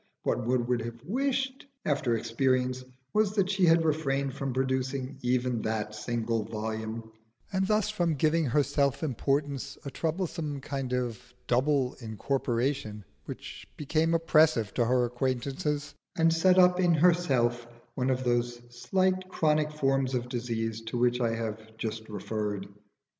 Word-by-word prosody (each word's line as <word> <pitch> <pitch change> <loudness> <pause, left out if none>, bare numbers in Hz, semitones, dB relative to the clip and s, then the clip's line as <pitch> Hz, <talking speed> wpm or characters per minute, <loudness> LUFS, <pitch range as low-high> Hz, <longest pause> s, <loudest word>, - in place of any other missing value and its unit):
What 125 -2 0
one 125 -1 +2
would 120 -1 0
have 115 0 -7
wished, 265 - -1 0.2
after 140 -5 +1
experience, 130 +2 0 0.3
was 210 -1 +2
that 195 -2 +2
she 190 -3 +3
had 165 0 +5
refrained 140 -3 0
from 135 0 -3
producing 130 +1 -1
even 125 -1 0
that 105 -1 -2
single 115 +1 -1
volume, 110 +1 -5 0.4
and 190 0 +1
thus 210 0 +2
from 175 -6 +1
giving 155 +3 +2
her 145 +3 +3
self 140 +1 0
importance 140 0 -1
a 140 - -4
troublesome 160 -3 -2
kind 135 -1 -4
of 125 -2 -1 0.2
double 130 +1 +2
incorporation 115 -1 -2 0.2
which - - -8
became 160 +3 +1
oppressive 155 -9 +3
to 120 - +2
her 125 +1 +3
acquaintances, 135 +4 -2 0.2
and 165 0 +4
set 180 +3 +4
up 180 0 +6
in 175 -2 +4
herself 135 -9 +2 0.3
one 130 +1 0
of 130 0 0
those 120 -1 0
slight 185 +10 0
chronic 155 -3 +2
forms 135 -3 +1
of 125 0 -2
disease 115 -2 -2
to 115 +2 -4
which 125 +1 +2
I 115 -1 +1
have 110 -1 -6
just 110 0 -4
referred. 105 -2 -3
130 Hz, 145 wpm, -29 LUFS, 120-155 Hz, 0.4 s, up